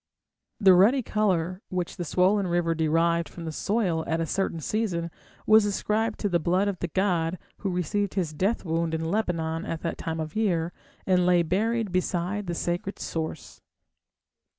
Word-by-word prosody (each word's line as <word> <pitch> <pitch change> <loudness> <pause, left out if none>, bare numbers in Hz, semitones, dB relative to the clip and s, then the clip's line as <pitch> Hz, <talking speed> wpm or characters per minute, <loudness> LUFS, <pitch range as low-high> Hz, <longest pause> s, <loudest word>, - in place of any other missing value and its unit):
The 195 -3 +7
ruddy 225 +9 +5
colour 185 -4 0
which 180 0 -3
the 175 - -3
swollen 185 +4 +2
river 175 -1 +1
derived 165 +1 +1
from 170 - -9
the 160 - -3
soil 185 -2 0
at 165 0 0
a 165 - 0
certain 170 0 -1
season 170 -2 -2 0.3
was 215 0 +6
ascribed 210 +2 0
to 205 - +1
the 175 -2 +2
blood 180 +5 +1
of 200 -3 -2
the 175 - -2
god, 175 -2 0 0.2
who 200 - -3
received 185 +3 -1
his 170 -6 -1
death 195 +8 0
wound 165 0 0
in 160 0 -2
Lebanon 165 -6 -1
at 165 - -4
that 165 - -3
time 160 0 -3
of 155 -1 -4
the - - -2
year, 175 -6 0 0.3
and 180 -1 +3
lay 175 -1 +4
buried 215 +5 0
beside 185 +2 -1
the 170 - -2
sacred 175 +4 -2
source." 160 -1 -5
180 Hz, 175 wpm, -26 LUFS, 165-200 Hz, 0.3 s, The